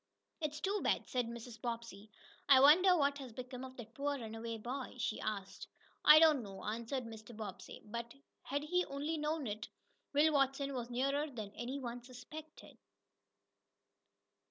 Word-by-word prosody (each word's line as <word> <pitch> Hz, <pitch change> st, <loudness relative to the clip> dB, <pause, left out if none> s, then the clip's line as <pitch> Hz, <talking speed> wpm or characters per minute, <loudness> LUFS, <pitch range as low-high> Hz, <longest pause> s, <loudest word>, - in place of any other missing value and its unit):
"It's 300 Hz, -1 st, -2 dB
too 395 Hz, +5 st, 0 dB
bad," -, -, +1 dB
said 250 Hz, -2 st, 0 dB
Mrs. 235 Hz, -1 st, -8 dB
Bobbsey. 230 Hz, -3 st, -5 dB, 0.4 s
"I 270 Hz, -2 st, +9 dB
wonder 355 Hz, +7 st, +7 dB
what 285 Hz, -1 st, +2 dB
has 260 Hz, -4 st, -8 dB
become 250 Hz, +1 st, -7 dB
of 260 Hz, 0 st, -9 dB
that 235 Hz, -2 st, -9 dB
poor 285 Hz, +1 st, -1 dB
runaway 225 Hz, -1 st, -5 dB
boy?" 250 Hz, +5 st, -5 dB
she 235 Hz, -2 st, -2 dB
asked. 200 Hz, -3 st, -4 dB, 0.4 s
"I 300 Hz, -, +10 dB
don't 310 Hz, -4 st, +7 dB
know," 195 Hz, -3 st, -9 dB
answered 235 Hz, +4 st, -2 dB
Mr. 225 Hz, -1 st, -10 dB
Bobbsey. 205 Hz, -4 st, -7 dB
But, 235 Hz, +3 st, -6 dB, 0.3 s
had 285 Hz, +1 st, -2 dB
he 360 Hz, +4 st, +2 dB
only 295 Hz, +3 st, -3 dB
known 300 Hz, 0 st, -1 dB
it, 215 Hz, 0 st, -4 dB, 0.5 s
Will 305 Hz, +2 st, +5 dB
Watson 275 Hz, 0 st, +2 dB
was 245 Hz, -2 st, -4 dB
nearer 275 Hz, +5 st, 0 dB
than 215 Hz, -6 st, -6 dB
any 245 Hz, +5 st, -4 dB
one 245 Hz, -2 st, -5 dB
suspected. 265 Hz, +6 st, -11 dB
255 Hz, 155 wpm, -36 LUFS, 230-285 Hz, 0.5 s, I